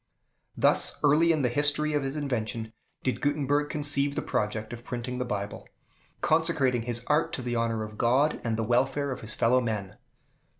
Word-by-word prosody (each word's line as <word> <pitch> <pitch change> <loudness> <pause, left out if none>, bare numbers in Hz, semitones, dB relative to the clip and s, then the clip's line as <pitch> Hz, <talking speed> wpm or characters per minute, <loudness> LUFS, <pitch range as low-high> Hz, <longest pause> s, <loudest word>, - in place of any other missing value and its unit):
Thus - - +3
early 155 +4 +5
in 155 -4 +1
the - - +3
history 145 +4 +1
of 145 - +1
his 135 +1 -3
invention 115 -6 -3 0.3
did 130 - -1
Gutenberg 145 0 +1
conceive 145 -2 +2
the - - -2
project 110 +2 -2
of 120 0 -8
printing 125 +1 -5
the 125 - -1
Bible; 100 -3 -5 0.5
consecrating 155 -7 +2
his 120 0 -3
art 155 +2 +1
to 130 - -4
the 120 -1 -2
honor 115 -1 0
of 105 0 -9
God, 135 +6 +2
and 115 -2 -1
the 115 - -1
welfare 135 +4 +1
of 130 - -5
his 110 - -4
fellow 125 +2 +3
men. 105 -5 -4
125 Hz, 180 wpm, -27 LUFS, 115-145 Hz, 0.5 s, early